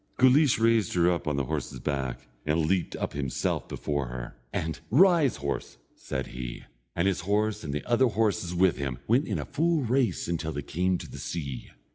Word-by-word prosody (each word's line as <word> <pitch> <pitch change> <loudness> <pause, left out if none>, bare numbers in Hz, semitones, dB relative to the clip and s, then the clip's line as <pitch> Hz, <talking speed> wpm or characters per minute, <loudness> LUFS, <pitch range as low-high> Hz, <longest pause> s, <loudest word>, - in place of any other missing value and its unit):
Guleesh 130 +1 +5
raised 115 -5 +2
her 90 0 +4
up 85 -2 -2
on 75 - +1
the 70 - 0
horse's 65 0 -3
back, 65 -2 -3 0.2
and 75 +1 +1
leaped 90 +1 0
up - - -3
himself 70 -3 -2
before 70 -3 -2
her, - - -7 0.2
and, 80 -2 -2
"Rise, 165 - +5
horse," 70 -3 -4 0.2
said 65 -1 -4
he; 60 -1 -6 0.3
and 85 +3 +2
his 95 - +1
horse, 105 +3 0
and 75 - -4
the 75 - -3
other 125 +2 +4
horses 105 -6 0
with 90 0 +3
him, 70 -3 -3
went 125 +7 +3
in - - -1
a - - -3
full 165 0 +1
race 125 +1 +1
until 80 -2 -2
they 70 - -4
came 90 +5 0
to - - -8
the - - -9
sea. 70 -7 -5
85 Hz, 195 wpm, -28 LUFS, 70-115 Hz, 0.3 s, Guleesh